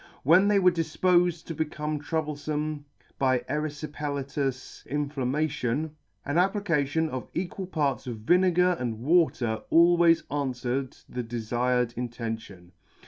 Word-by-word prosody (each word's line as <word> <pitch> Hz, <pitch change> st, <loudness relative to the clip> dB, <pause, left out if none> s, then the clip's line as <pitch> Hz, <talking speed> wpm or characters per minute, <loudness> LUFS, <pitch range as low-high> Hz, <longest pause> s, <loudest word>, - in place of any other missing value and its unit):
When 175 Hz, +8 st, +6 dB
they 205 Hz, -1 st, +4 dB
were 185 Hz, -2 st, +5 dB
difpofed 175 Hz, +1 st, +2 dB
to 165 Hz, -, -5 dB
become 150 Hz, -1 st, -3 dB
troublefome 150 Hz, -1 st, -3 dB, 0.3 s
by 130 Hz, -2 st, +2 dB
eryfipelatous 145 Hz, -3 st, -3 dB
inflammation, 145 Hz, 0 st, -1 dB, 0.3 s
an 145 Hz, +4 st, +1 dB
application 165 Hz, -6 st, +1 dB
of 130 Hz, -4 st, -6 dB
equal 185 Hz, +1 st, -3 dB
parts 145 Hz, -6 st, -1 dB
of 120 Hz, -3 st, -4 dB
vinegar 180 Hz, +5 st, +3 dB
and 120 Hz, -3 st, -2 dB
water 130 Hz, -7 st, +2 dB
always 170 Hz, 0 st, +5 dB
anfwered 130 Hz, -2 st, -3 dB
the 125 Hz, -, -4 dB
defired 120 Hz, +1 st, -1 dB
intention. 115 Hz, -7 st, -6 dB
150 Hz, 110 wpm, -27 LUFS, 125-165 Hz, 0.3 s, When